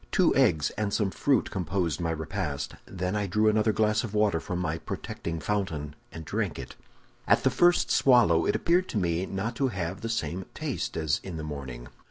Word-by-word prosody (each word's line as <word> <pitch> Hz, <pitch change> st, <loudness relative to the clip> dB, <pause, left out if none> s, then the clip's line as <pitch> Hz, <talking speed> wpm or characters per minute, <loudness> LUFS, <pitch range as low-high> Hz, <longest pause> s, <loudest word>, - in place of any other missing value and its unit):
Two -, -, +3 dB
eggs 75 Hz, -2 st, +3 dB
and 105 Hz, -2 st, 0 dB
some 100 Hz, -2 st, +1 dB
fruit 130 Hz, -, +1 dB
composed 90 Hz, -2 st, -1 dB
my 85 Hz, -, 0 dB
repast; 75 Hz, -3 st, -3 dB
then 90 Hz, +1 st, -3 dB
I 105 Hz, -1 st, 0 dB
drew 105 Hz, +4 st, +2 dB
another 110 Hz, 0 st, +3 dB
glass 110 Hz, 0 st, +2 dB
of 110 Hz, -3 st, -5 dB
water 105 Hz, -5 st, +3 dB
from 90 Hz, -, -4 dB
my 80 Hz, -2 st, -2 dB
protecting 85 Hz, -1 st, -5 dB
fountain, 80 Hz, -8 st, -2 dB, 0.2 s
and 80 Hz, -1 st, -8 dB
drank -, -, -2 dB
it. -, -, -8 dB, 0.5 s
"At -, -, +4 dB
the 130 Hz, -, +3 dB
first 175 Hz, +7 st, +3 dB
swallow, 115 Hz, -11 st, +5 dB
it -, -, +2 dB
appeared 180 Hz, +2 st, +2 dB
to -, -, -2 dB
me 90 Hz, -1 st, 0 dB
not 105 Hz, +6 st, -3 dB
to 135 Hz, -, +2 dB
have 95 Hz, -4 st, -4 dB
the 115 Hz, -, -3 dB
same 95 Hz, -4 st, -2 dB
taste -, -, -3 dB
as 80 Hz, -3 st, +1 dB
in 90 Hz, -4 st, -6 dB
the 80 Hz, -, -5 dB
morning. 65 Hz, -5 st, -6 dB
95 Hz, 200 wpm, -28 LUFS, 80-110 Hz, 0.5 s, swallow